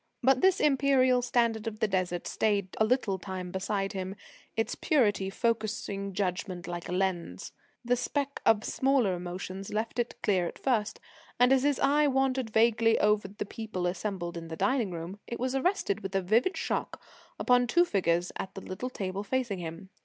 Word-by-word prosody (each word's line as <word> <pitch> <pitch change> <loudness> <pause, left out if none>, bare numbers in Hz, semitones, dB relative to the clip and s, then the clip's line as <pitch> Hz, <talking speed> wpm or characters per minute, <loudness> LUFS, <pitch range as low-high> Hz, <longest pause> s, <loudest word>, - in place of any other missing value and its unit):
But 260 0 +4
this 380 -1 +4
imperial 265 -3 +4
standard 235 -2 +1
of 215 -1 -5
the 220 - +2
Desert 185 -3 -1
stayed 200 -3 0
a - - +5
little 215 -5 +1
time 185 -2 -6
beside 195 +1 -2
him, 190 0 -4 0.4
its 225 +1 0
purity 210 - +2
focussing 205 -3 -2
judgment 180 -1 -2
like 175 -1 -5
a - - -3
lens. 180 - -2 0.3
The 245 +1 +3
specks 280 +3 -2
of 220 -1 +4
smaller 265 -7 +2
emotions 180 +2 -6
left 220 +3 -2
it 240 - -2
clear 185 -4 +2
at - - -8
first, 220 -6 0 0.4
and 250 +2 +6
as 265 - +4
his 285 0 +1
eye 290 +2 +4
wandered 265 -3 +1
vaguely 225 +1 +4
over 210 -1 +2
the 205 +1 -6
people 215 -4 -5
assembled 175 -1 -3
in 165 0 -7
the 165 - -6
dining 210 +4 +1
room, 175 +3 -6
it 235 - -5
was 255 +1 -1
arrested 270 - 0
with 195 0 -6
a 195 - +3
vivid 230 - +2
shock - - -2 0.4
upon 245 0 +3
two 345 +8 +4
figures 175 - +1
at 190 - -6
the 195 - -6
little 190 +8 -5
table 195 -5 -4
facing 235 -4 -1
him. 170 +3 -7
210 Hz, 180 wpm, -29 LUFS, 185-250 Hz, 0.4 s, and